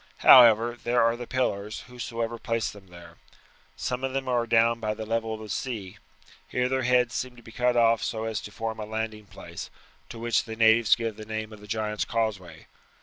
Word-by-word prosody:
However, 120 -1 +7
there 120 0 +2
are 115 0 +2
the 120 0 -8
pillars, 105 -5 -2
whosoever 115 -2 -5
placed 115 -1 -2
them 100 -2 -15
there. 85 -1 -14 0.6
Some 125 +1 -3
of 135 0 -2
them 135 -1 -2
are 120 -2 0
down 115 0 +3
by 105 -1 -2
the 110 0 -6
level 115 0 -2
of 110 - -10
the 110 - -8
sea. 105 -7 -5 0.5
Here 125 0 0
their 130 +1 0
heads 125 -1 +2
seem 125 -1 -4
to 120 - -16
be 115 - -13
cut 125 +1 +1
off 115 -1 +4
so 110 0 -3
as 110 -1 -3
to 105 - -9
form 110 0 -5
a 105 - -4
landing 110 -1 -5
place, - - -9 0.4
to 115 - -9
which 115 -1 0
the 110 -1 -6
natives 110 0 +5
give 115 -3 -4
the 110 - -8
name 110 0 -5
of 105 - -13
the 105 - -13
Giant's 105 0 -2
Causeway. 100 -8 -3
115 Hz, 210 wpm, -26 LUFS, 110-120 Hz, 0.6 s, However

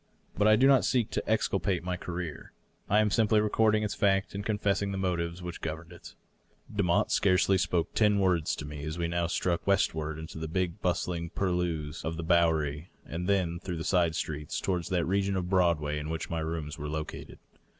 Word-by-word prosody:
But 105 +4 +3
I 110 - +7
do 130 - +4
not 135 -2 +6
seek 120 -4 +1
to - - -3
exculpate 100 -5 +1
my 90 0 -2
career; 90 -3 -6 0.4
I 105 +2 +5
am 105 -1 +1
simply 110 +2 +3
recording 110 0 +2
its 105 -1 -1
fact 100 -2 +1
and 100 +1 -4
confessing, 100 -1 0
the 95 - -3
motives 90 -2 -2
which 90 -1 -6
governed 80 +2 -5
it. 85 - -12 0.6
Demotte 90 -4 +2
scarcely 95 0 +3
spoke 85 -2 0
ten 105 -2 +3
words 90 -5 +2
to 75 - -6
me 75 -1 -7
as 80 +1 -4
we 85 -1 -1
now 85 0 0
struck 85 +1 -1
west 100 0 +3
ward 80 -1 -4
into 80 0 -8
the 80 - -4
big, 90 +3 -2
bustling 85 -1 -1
purlieus 90 -5 -2
of 80 +2 -3
the 85 - -4
Bowery, 80 -2 +1 0.2
and 90 +3 -4
then 90 -4 +1
through 85 -3 -4
side 85 -3 +2
streets 75 0 -3
toward 90 -3 -1
that 90 -1 0
region 100 +1 +1
of 90 0 -2
Broadway 80 -5 +2
in 75 +1 -5
which 80 +1 -4
my 85 - -1
rooms 80 -1 -4
were 75 +1 -4
located. 75 0 -6
90 Hz, 200 wpm, -29 LUFS, 80-100 Hz, 0.6 s, I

